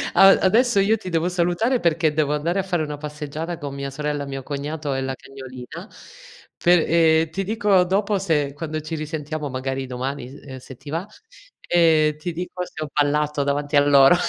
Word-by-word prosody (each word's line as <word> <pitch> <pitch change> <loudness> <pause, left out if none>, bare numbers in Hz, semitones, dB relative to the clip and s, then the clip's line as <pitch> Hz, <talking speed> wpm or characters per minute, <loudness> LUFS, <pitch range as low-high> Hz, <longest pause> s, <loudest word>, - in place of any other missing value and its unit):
A 195 - +8
adesso 220 +3 +4
io 215 +3 +3
ti 185 -3 -7
devo 170 +1 0
salutare, 180 +8 +1
perché 160 -2 +2
devo 150 -1 +1
andare 170 +6 -1
a - - 0
fare 175 -4 -1
una 150 -1 -5
passeggiata 150 +3 -5
con 140 -1 -6
mia 140 0 -4
sorella, 145 +1 -3
mio 135 -1 -6
cognato 145 +1 -4
e 135 - -1
la 130 0 -3
cagnolina 135 - -10 0.7
per 175 -1 +5
ehm, 160 -1 +4
ti 195 +4 -3
dico 205 -3 +3
dopo 200 +3 +1
se 150 -7 0
quando 155 +1 -4
ci 160 +2 -5
risentiamo, 155 -1 -4
magari 135 +1 -3
domani 130 +1 -4
s 135 -1 -11
se 130 +1 -11
ti 145 - -12
va, 165 +5 -2 0.6
e 160 -3 +4
ti 175 +3 -3
dico 180 +1 -4
se 155 - -7
ho 150 - -6
ballato 150 0 +1
davanti 145 +1 -1
a 145 - +7
loro. 140 +3 +7
155 Hz, 190 wpm, -22 LUFS, 140-175 Hz, 0.7 s, A